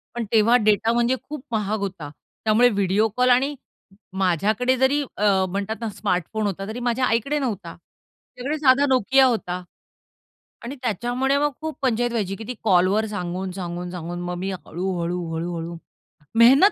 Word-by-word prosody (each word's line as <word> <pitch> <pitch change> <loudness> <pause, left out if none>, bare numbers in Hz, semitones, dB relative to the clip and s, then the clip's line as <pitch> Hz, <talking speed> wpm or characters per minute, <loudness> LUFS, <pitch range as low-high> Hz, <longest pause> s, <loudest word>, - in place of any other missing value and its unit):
पण 235 -2 -2
तेव्हा 225 +2 +5
डेटा 215 +2 +3
म्हणजे 240 +2 +2
खूप 295 -3 -8
महाग 215 -1 -1
होता. 185 -7 -5 0.4
त्यामुळे 230 +3 +5
व्हिडिओ 200 +1 +2
कॉल 250 0 +4
आणि 270 +4 +3 0.6
माझ्याकडे 205 +8 +2
जरी 270 +3 +3 0.2
अ, 195 -2 +3
म्हणतात 200 +3 -3
ना 225 - -2
स्मार्टफोन 205 +1 -2
होता 195 +1 -4
तरी 225 +3 -5
माझ्या 250 +2 +1
आईकडे 275 +7 0
नव्हता. 225 -8 -4
तिच्याकडे 280 +5 -8
साधा 275 0 +5
नोकिया 260 +2 +4
होता 180 -7 -1 1.0
आणि 260 +4 -6
त्याच्यामुळे 245 +5 0
मग 295 0 +1
खूप 315 -1 -5
पंचायत 240 -2 +1
व्हायची 200 -4 -2
की 220 - -8
ती 250 - -3
कॉलवर 195 +2 +3
सांगून, 185 -2 -4
सांगून, 175 -1 -5
सांगून. 175 0 -5
मग 175 0 -3
मी 190 +2 -3
हळू-हळू, 180 -1 -3
हळू-हळू 170 0 -4 0.6
मेहनत 270 - +7
215 Hz, 155 wpm, -23 LUFS, 185-250 Hz, 1.0 s, मेहनत